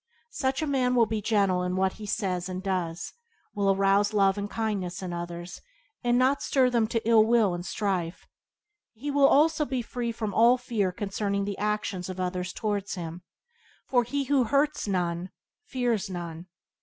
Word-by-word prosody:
Such 265 Hz, -, -1 dB
a -, -, +1 dB
man 255 Hz, -3 st, +1 dB
will 235 Hz, -2 st, +5 dB
be 215 Hz, 0 st, -2 dB
gently 195 Hz, -4 st, +2 dB
in 180 Hz, -, -2 dB
what 190 Hz, 0 st, +1 dB
he 210 Hz, -, -9 dB
says 185 Hz, -3 st, -2 dB
and 185 Hz, 0 st, -5 dB
does, 175 Hz, -3 st, -2 dB, 0.4 s
will 200 Hz, -1 st, +1 dB
arouse 195 Hz, +1 st, +3 dB
love 195 Hz, -1 st, +4 dB
and 205 Hz, 0 st, -4 dB
kindness 195 Hz, -5 st, -3 dB
in 180 Hz, -1 st, -4 dB
others, 175 Hz, 0 st, -6 dB, 0.4 s
and 240 Hz, 0 st, +3 dB
not 260 Hz, +3 st, +3 dB
stir 255 Hz, -2 st, +2 dB
them 235 Hz, -2 st, +3 dB
up -, -, -7 dB
to 230 Hz, -1 st, -2 dB
ill 225 Hz, -2 st, +6 dB
will 220 Hz, -4 st, +3 dB
and 175 Hz, 0 st, -4 dB
strife. 185 Hz, -3 st, -2 dB, 0.7 s
He 275 Hz, +6 st, -5 dB
will 280 Hz, -1 st, +5 dB
also 310 Hz, +2 st, +4 dB
be 260 Hz, -4 st, -2 dB
free 235 Hz, 0 st, -3 dB
from 220 Hz, -3 st, -4 dB
all 235 Hz, +3 st, +5 dB
fear 225 Hz, -6 st, -1 dB
concerning 200 Hz, +1 st, -2 dB
the 200 Hz, -1 st, -4 dB
actions 205 Hz, -3 st, -2 dB
of 185 Hz, 0 st, -6 dB
others 180 Hz, 0 st, -2 dB
towards 205 Hz, -2 st, -2 dB
him, 170 Hz, -1 st, -6 dB, 0.6 s
for 245 Hz, -2 st, +2 dB
he 280 Hz, +4 st, -2 dB
who 270 Hz, -2 st, +2 dB
hurts 280 Hz, +3 st, +1 dB
none 180 Hz, -2 st, -1 dB, 0.4 s
fears 240 Hz, -, -1 dB
none. 170 Hz, -1 st, -6 dB
205 Hz, 180 wpm, -27 LUFS, 185-240 Hz, 0.7 s, ill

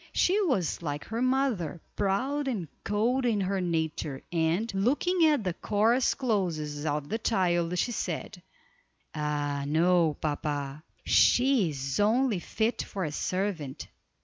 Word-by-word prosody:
She 390 Hz, +4 st, +3 dB
was 250 Hz, -, 0 dB
like 145 Hz, -3 st, -3 dB
her 225 Hz, +2 st, -3 dB
mother, 255 Hz, -, 0 dB, 0.2 s
proud 260 Hz, +9 st, 0 dB
and 205 Hz, -11 st, -2 dB, 0.2 s
cold 235 Hz, +6 st, +1 dB
in 230 Hz, -4 st, +1 dB
her 190 Hz, 0 st, -1 dB
nature, 160 Hz, -5 st, -2 dB
and, 175 Hz, +6 st, 0 dB
looking 295 Hz, -, +2 dB
at 295 Hz, -7 st, +2 dB
the 180 Hz, -3 st, -1 dB
coarse 220 Hz, +7 st, +2 dB
clothes 165 Hz, -, -1 dB
of 145 Hz, -1 st, -1 dB
the 225 Hz, -, -2 dB
child, 180 Hz, -6 st, +1 dB
she 240 Hz, -, 0 dB
said: -, -, -4 dB, 0.7 s
"Ah, 145 Hz, -2 st, -2 dB
no, 165 Hz, 0 st, +3 dB
papa, 145 Hz, -1 st, -3 dB, 0.2 s
she 250 Hz, -7 st, +4 dB
is 135 Hz, 0 st, -3 dB
only 220 Hz, 0 st, +2 dB
fit 220 Hz, +6 st, -1 dB
for 195 Hz, -, -4 dB
a 155 Hz, -, -2 dB
servant. 180 Hz, -4 st, -3 dB
185 Hz, 135 wpm, -28 LUFS, 155-235 Hz, 0.7 s, she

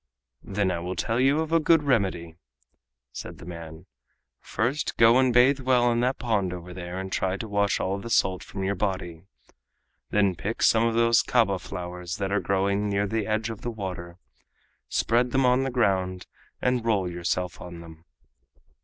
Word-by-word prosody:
"Then 100 Hz, -1 st, -1 dB
I 85 Hz, -, -2 dB
will 90 Hz, +2 st, -4 dB
tell 115 Hz, +1 st, -1 dB
you 140 Hz, +4 st, +3 dB
of 160 Hz, 0 st, -4 dB
a 165 Hz, -, +4 dB
good 160 Hz, 0 st, +4 dB
remedy," 95 Hz, -, 0 dB, 0.8 s
said -, -, -8 dB
the -, -, -12 dB
man. 85 Hz, -1 st, -9 dB, 0.5 s
"First 130 Hz, +7 st, -2 dB
go 115 Hz, +2 st, +6 dB
and 130 Hz, -1 st, +3 dB
bathe 125 Hz, +3 st, +5 dB
well 125 Hz, -2 st, +3 dB
in 115 Hz, -, +1 dB
that 125 Hz, +2 st, +1 dB
pond 105 Hz, -7 st, -1 dB
over 90 Hz, 0 st, -8 dB
there 90 Hz, 0 st, -6 dB
and 95 Hz, 0 st, -6 dB
try 95 Hz, +1 st, -1 dB
to 110 Hz, -, -6 dB
wash 100 Hz, -1 st, +1 dB
all 95 Hz, +2 st, -1 dB
the 115 Hz, -, -7 dB
salt 95 Hz, -5 st, +1 dB
from 95 Hz, 0 st, -6 dB
your 95 Hz, +1 st, 0 dB
body. 95 Hz, -3 st, -3 dB, 0.8 s
Then 100 Hz, -2 st, +2 dB
pick 100 Hz, +6 st, -4 dB
some 115 Hz, 0 st, +5 dB
of 115 Hz, -, -1 dB
those 115 Hz, 0 st, +4 dB
kaba 105 Hz, -6 st, +2 dB
flowers 90 Hz, 0 st, -6 dB
that 100 Hz, -1 st, -2 dB
are 105 Hz, -, +2 dB
growing 100 Hz, +2 st, 0 dB
near 100 Hz, 0 st, +1 dB
the 110 Hz, 0 st, -2 dB
edge 110 Hz, +1 st, -1 dB
of 110 Hz, -, -9 dB
the 120 Hz, -, -3 dB
water, 90 Hz, -5 st, -6 dB, 0.7 s
spread 120 Hz, +2 st, +1 dB
them 135 Hz, +1 st, +2 dB
on 125 Hz, +1 st, +4 dB
the 135 Hz, -, -1 dB
ground 95 Hz, -7 st, 0 dB, 0.4 s
and 125 Hz, -2 st, +1 dB
roll 105 Hz, -5 st, +1 dB
yourself 90 Hz, +1 st, -3 dB
on 85 Hz, -1 st, -9 dB
them. 80 Hz, 0 st, -14 dB
100 Hz, 185 wpm, -26 LUFS, 90-120 Hz, 0.8 s, go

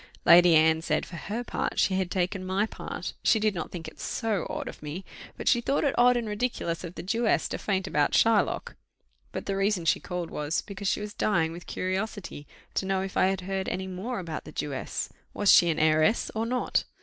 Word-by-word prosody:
Lady 175 Hz, -1 st, +8 dB
Anne 160 Hz, 0 st, +4 dB
said, -, -, 0 dB
for 175 Hz, -, -10 dB
her 210 Hz, +8 st, -4 dB
part, -, -, -2 dB
she 195 Hz, -, +3 dB
had 185 Hz, -1 st, 0 dB
taken 185 Hz, +1 st, -1 dB
my 190 Hz, +3 st, +1 dB
part; -, -, -6 dB
she 220 Hz, -, +4 dB
did 215 Hz, -1 st, +2 dB
not 170 Hz, -4 st, -4 dB
think 170 Hz, -3 st, -7 dB
it -, -, -11 dB
so 220 Hz, -6 st, -2 dB
odd -, -, -4 dB
of -, -, -8 dB
me, 155 Hz, +5 st, -6 dB, 0.3 s
but -, -, -6 dB
she 240 Hz, -, +4 dB
thought 275 Hz, +4 st, 0 dB
it 280 Hz, -, +2 dB
odd 245 Hz, 0 st, +5 dB
and 235 Hz, -2 st, -2 dB
ridiculous 210 Hz, -6 st, -2 dB
of 175 Hz, 0 st, -7 dB
the 165 Hz, -, -6 dB
Jewess 225 Hz, +5 st, +1 dB
to -, -, -4 dB
faint 190 Hz, -2 st, -1 dB
about 150 Hz, -5 st, +1 dB
Shylock. 225 Hz, -2 st, +2 dB, 0.6 s
But -, -, -5 dB
the 195 Hz, -, -1 dB
reason 195 Hz, -3 st, +1 dB
she -, -, +3 dB
called 180 Hz, -2 st, -5 dB
was, 150 Hz, +2 st, -1 dB
because 200 Hz, 0 st, -6 dB
she 205 Hz, -, +1 dB
was 210 Hz, 0 st, -6 dB
dying 165 Hz, -9 st, +1 dB
with 170 Hz, -1 st, -10 dB
curiosity 185 Hz, -5 st, -4 dB, 0.3 s
to 190 Hz, -, -1 dB
know 190 Hz, -1 st, +1 dB
if 195 Hz, -, -6 dB
I -, -, +4 dB
had 190 Hz, 0 st, -1 dB
heard 190 Hz, +1 st, -2 dB
any 185 Hz, +1 st, -3 dB
more 190 Hz, +7 st, -4 dB
about 165 Hz, -4 st, -5 dB
the -, -, -10 dB
Jewess. 140 Hz, -2 st, -3 dB, 0.3 s
Was 205 Hz, -, +4 dB
she 175 Hz, -, +7 dB
an 160 Hz, -, 0 dB
heiress 155 Hz, +7 st, +3 dB
or 225 Hz, +1 st, -1 dB
not? 250 Hz, +1 st, 0 dB
190 Hz, 220 wpm, -27 LUFS, 170-215 Hz, 0.6 s, Lady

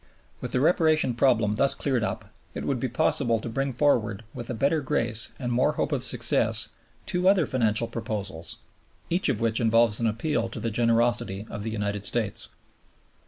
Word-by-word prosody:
With -, -, -6 dB
the 125 Hz, -, +1 dB
Reparation 155 Hz, -4 st, +3 dB
problem 115 Hz, -4 st, +2 dB
thus 140 Hz, +2 st, +2 dB
cleared 130 Hz, -5 st, -1 dB
up 95 Hz, -2 st, -3 dB, 0.3 s
it -, -, -4 dB
would 135 Hz, -3 st, -1 dB
be 130 Hz, -, -1 dB
possible 125 Hz, -3 st, +2 dB
to 110 Hz, -, -7 dB
bring 135 Hz, +4 st, -2 dB
forward 115 Hz, -6 st, +1 dB
with 120 Hz, -, -7 dB
a 125 Hz, -, -3 dB
better 140 Hz, +7 st, +1 dB
grace 115 Hz, -6 st, 0 dB
and 120 Hz, -3 st, -3 dB
more 130 Hz, +5 st, +2 dB
hope -, -, -2 dB
of 135 Hz, -4 st, -1 dB
success 115 Hz, -2 st, +2 dB, 0.4 s
two 180 Hz, +1 st, 0 dB
other 190 Hz, -5 st, +3 dB
financial 115 Hz, -3 st, +1 dB
proposals, 105 Hz, -7 st, -5 dB, 0.5 s
each 175 Hz, -2 st, +2 dB
of 125 Hz, -6 st, 0 dB
which 115 Hz, -1 st, +1 dB
involves 115 Hz, -1 st, +3 dB
an 115 Hz, -, +1 dB
appeal 115 Hz, +1 st, -1 dB
to 115 Hz, -, -7 dB
the 115 Hz, +1 st, -2 dB
generosity 115 Hz, -3 st, +1 dB
of 105 Hz, -, -5 dB
the 110 Hz, -, -3 dB
United 105 Hz, -2 st, -3 dB
States. 105 Hz, 0 st, +1 dB
115 Hz, 180 wpm, -26 LUFS, 110-135 Hz, 0.5 s, Reparation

